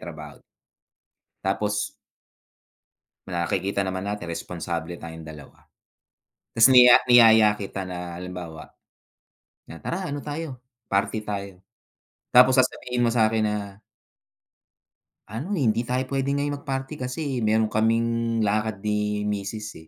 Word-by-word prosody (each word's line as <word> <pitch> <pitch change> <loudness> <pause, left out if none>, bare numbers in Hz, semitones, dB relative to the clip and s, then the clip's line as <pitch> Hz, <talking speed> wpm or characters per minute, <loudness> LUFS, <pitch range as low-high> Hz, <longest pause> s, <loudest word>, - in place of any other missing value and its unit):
trabaho. - - -9 1.1
Tapos 105 +2 -1 1.4
nakikita 95 +3 -1
naman 95 0 -4
natin 100 -4 -4
responsable 85 0 -5
tayong 80 -1 -9
dalawa, 75 -3 -13 0.9
'tas 115 +3 +6
niya 125 -1 +8
niyaya 110 -3 +7
kita 95 -1 -5
na 90 -1 -6
halimbawa 90 -3 -8 1.0
na, 85 - -9
"Tara, 180 -2 -3
ano 145 0 -5
tayo, 150 -3 -5 0.3
party 100 +2 0
tayo." 100 -3 -6 0.7
Tapos 125 +1 +7
sasabihin 125 -1 0
mo 115 - +3
sa'kin 110 -2 +2
na 100 -1 -4 1.5
"Ano, 120 - -6
hindi 120 -3 +1
tayo 125 +2 -1
puwede 135 0 -1
ngayon 145 +1 -1
mag-party 135 +1 -4
kasi 130 0 -3
meron 110 +1 +2
kaming 115 +1 0
lakad 105 0 -1
ni 105 0 -1
misis, 105 +1 -4
eh." 80 0 -13
105 Hz, 115 wpm, -24 LUFS, 95-125 Hz, 1.5 s, niya